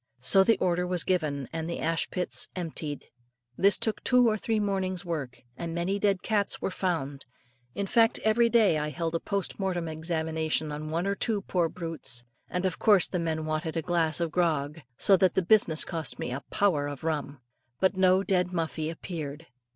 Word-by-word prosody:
So 125 +10 +6
the 225 +3 +3
order 180 0 0
was 180 -2 -1
given, 150 -7 -1
and 160 0 -3
the 170 - -4
ash 165 0 0
pits 180 -1 -1
emptied. 160 -4 -4 0.5
This 200 +5 +5
took 220 - -1
two 250 -1 +4
or 215 - +2
three 220 +1 -1
mornings' 190 -2 -2
work, 145 -8 -5
and 165 +3 -5
many 185 +4 -1
dead 200 -2 +1
cats 210 -2 0
were - - -2
found; 145 -8 -3 0.5
in 200 - -1
fact, 225 +3 +3
every 230 +2 +3
day 215 -9 +4
I 150 0 -2
held 165 +1 -3
a 165 - 0
post 200 +1 -3
mortem 180 -4 -1
examination 160 -1 -1
on 150 +1 -5
one 165 +3 -1
or 200 - +1
two 205 0 -1
poor 175 -4 0
brutes, 160 -9 -5 0.3
and 180 +1 -2
of 185 - -1
course 205 -4 +5
the 180 - -2
men 160 -1 -2
wanted 155 +1 -2
a 165 - -1
glass 165 -2 +1
of 170 -2 -1
grog; 155 -3 0 0.2
so 195 - +5
that 185 -1 +2
the 190 - +1
business 175 -6 +4
cost 160 -6 -4
me 125 - -4
"a 130 +3 -4
power" 180 -9 +1
of 145 0 -7
rum. 145 -3 -3 0.4
But 190 +1 +2
no 185 0 +4
dead 180 -2 +1
Muffie 160 -2 -2
appeared. 160 -2 -6
170 Hz, 195 wpm, -28 LUFS, 155-190 Hz, 0.5 s, So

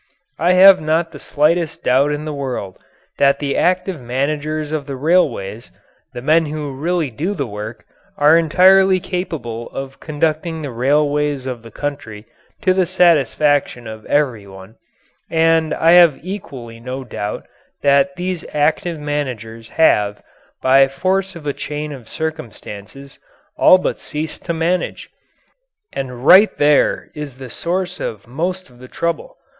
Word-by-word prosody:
I 175 +4 +3
have 190 0 +8
not 160 +2 0
the 145 - -11
slightest 160 +3 0
doubt 135 +4 +3
in 150 +1 -3
the 155 - -4
world 130 -9 -5 0.4
that 140 0 +4
the 140 -1 -2
active 180 -3 0
managers 150 +5 -2
of 150 -2 -3
the 140 - -4
railways, 130 - 0 0.4
the 120 -2 -8
men 160 +3 +3
who 150 -1 -4
really 160 +1 -1
do 170 - -3
the 140 -6 -2
work, 105 +1 -8 0.3
are 150 +2 +5
entirely 185 +3 +5
capable 150 - -5
of 135 0 -7
conducting 160 +1 -2
the 140 - -5
railways 145 +2 0
of 125 -3 -5
the 115 - -12
country 115 -5 -6 0.4
to 185 -3 +4
the 185 -1 +1
satisfaction 150 -7 +2
of 110 -1 -8
every 125 -9 0
one, 95 +2 -13 0.5
and 165 -1 +2
I 165 - +3
have 170 -4 +7
equally 135 - -8
no 130 +3 -6
doubt 105 -4 -5 0.4
that 140 +6 +3
these 180 -1 -3
active 160 +3 0
managers 120 -7 -5
have, 105 -10 +2 0.4
by 135 +1 +5
force 190 +7 -1
of 165 -3 -10
a 145 - -1
chain 150 +2 -5
of 130 -6 -10
circumstances, 135 -3 -7 0.4
all 185 - +6
but 185 - -3
ceased 150 +1 -6
to - - -1
manage. 170 +2 -2 0.8
And 125 -1 -5
right 200 +6 +7
there 145 0 +2
is 150 -4 -7
the 130 -3 -9
source 180 +1 -3
of 105 -3 -5
most 180 +9 -3
of 120 - -20
the 130 - -11
trouble. 170 +4 -4
150 Hz, 150 wpm, -18 LUFS, 130-165 Hz, 0.8 s, have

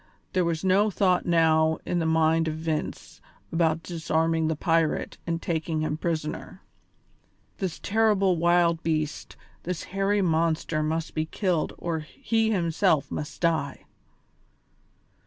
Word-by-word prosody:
There 185 -2 +2
was 170 -1 -1
no 195 +3 +3
thought 185 -2 +1
now 160 -2 +3
in 175 - 0
the 165 - 0
mind 160 0 +3
of 155 - -2
Vince 160 -1 -4 0.3
about 165 -1 +1
disarming 165 -1 0
the 160 - 0
pirate 165 0 0
and 165 0 -1
taking 160 -2 -2
him 155 -1 -1
prisoner; 155 -1 -4 1.0
this 185 -4 -3
terrible 205 -3 +2
wild 170 0 +3
beast, 155 -2 -2 0.2
this 180 -2 -4
hairy 195 +1 +1
monster 160 -2 +1
must 160 +1 -2
be 155 0 -1
killed 180 -3 -1
or 170 -2 -2
he 225 - -1
himself 170 -4 +1
must 150 - -5
die. 160 -5 0
165 Hz, 130 wpm, -26 LUFS, 160-180 Hz, 1.0 s, no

